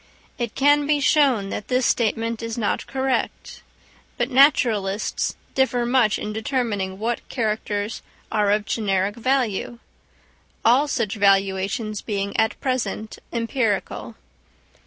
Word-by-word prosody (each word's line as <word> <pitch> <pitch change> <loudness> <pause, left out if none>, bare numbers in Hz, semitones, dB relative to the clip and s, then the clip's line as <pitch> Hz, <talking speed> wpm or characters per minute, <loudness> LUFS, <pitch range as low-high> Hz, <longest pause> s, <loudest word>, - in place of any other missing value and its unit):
It 235 -3 -3
can 290 +1 +4
be 295 -1 +3
shown 275 -9 +3
that 210 - -5
this 255 -1 +1
statement 230 0 0
is 230 0 -4
not 215 -3 -1
correct; 265 -1 -2 0.6
but 245 +3 -1
naturalists 225 -7 +2 0.2
differ 255 -2 +1
much 240 -4 +3
in 210 - -5
determining 215 -5 -2
what 230 +3 -3
characters 215 -2 -2 0.3
are 210 -2 +2
of 210 0 +2
generic 200 -2 0
value; 240 -2 0 0.9
all 255 +6 +5
such 230 -8 -1
valuations 200 +2 +1
being 200 -2 -3
at 220 - +1
present 220 -4 -2
empirical. 230 -3 -2
225 Hz, 115 wpm, -23 LUFS, 205-255 Hz, 0.9 s, all